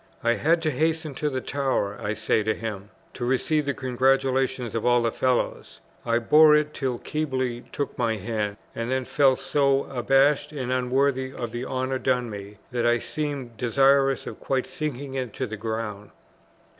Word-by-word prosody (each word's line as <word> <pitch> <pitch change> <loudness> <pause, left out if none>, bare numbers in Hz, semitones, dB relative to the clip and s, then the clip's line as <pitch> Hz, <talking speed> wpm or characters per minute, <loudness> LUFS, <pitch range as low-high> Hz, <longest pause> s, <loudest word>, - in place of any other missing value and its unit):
"I 120 0 +3
had 165 +6 +2
to 155 - +1
hasten 160 +2 0
to 150 +3 -1
the 130 -2 -3
Tower," 130 -9 -1
I 105 +1 -2
say 110 - +1
to 110 +1 0
him, 105 -3 -6 0.2
"to 125 - -6
receive 140 +4 +1
the 140 - 0
congratulations 130 -1 +1
of 115 - -2
all 120 -1 +3
the 115 - +1
Fellows. 130 +1 -1 0.3
I 115 0 +3
bore 150 +6 +6
it 150 0 +1
till 130 -3 -2
Keble 130 -6 -2
took 145 - -3
my 115 -2 +1
hand, 105 0 -3 0.2
and 115 +1 -4
then 130 0 0
felt 135 -2 +3
so 140 0 +2
abashed 135 +4 +2
and 130 -4 -3
unworthy 130 +1 +1
of 120 -3 -5
the 120 +2 -4
honour 130 0 -2
done 125 -3 0
me, 100 0 -8
that 120 -1 -1
I 120 0 +4
seemed 140 -3 -4
desirous 135 +2 +3
of - - -7
quite 130 -1 -1
sinking 140 0 -5
into 130 -1 -3
the 110 -2 -5
ground." 110 -1 -4
130 Hz, 175 wpm, -25 LUFS, 120-140 Hz, 0.3 s, bore